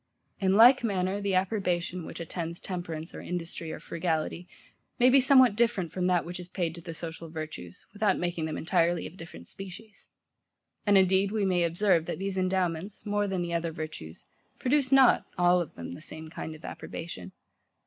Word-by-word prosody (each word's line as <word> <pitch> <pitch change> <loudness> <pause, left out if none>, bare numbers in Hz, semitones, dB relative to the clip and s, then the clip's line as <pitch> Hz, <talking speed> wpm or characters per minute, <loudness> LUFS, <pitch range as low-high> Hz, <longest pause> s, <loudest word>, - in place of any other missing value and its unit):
In 190 -1 +2
like 245 +4 +8
manner 195 -2 0
the 200 -2 0
approbation, 185 -3 -1
which - - -8
attends 170 0 -5
temperance 170 -3 -5
or - - -7
industry 170 -2 -5
or - - -6
frugality, 170 +1 -2 0.5
may 250 0 +5
be 275 - +7
somewhat 260 -4 +6
different 220 -8 +1
from 180 +1 -1
that 180 -2 +2
which 175 +1 -5
is 180 - -7
paid 175 -3 -2
to 170 - -9
the 165 -1 -7
social 165 0 -6
virtues, 155 - -7
without 210 0 +2
making 175 -2 -2
them 155 - -3
entirely 170 0 +1
of - - -8
a - - -16
different 165 - -11
species. 195 +3 -10 0.8
And, 205 -1 +6
indeed, 190 +1 +4
we 210 -2 0
may 180 -2 +2
observe, 170 0 +2
that - - -3
these 195 0 -3
endowments, 185 0 -1
more 205 0 0
than 190 -2 -1
the 170 0 -4
other 170 0 -1
virtues, 155 - -8 0.3
produce 270 0 +1
not, 270 -2 +6
all 180 0 +4
of 170 - -7
them, 85 - -7
the - - -9
same 155 0 -7
kind 160 - -6
of 155 - -13
approbation. 95 - -7
180 Hz, 190 wpm, -28 LUFS, 165-200 Hz, 0.8 s, like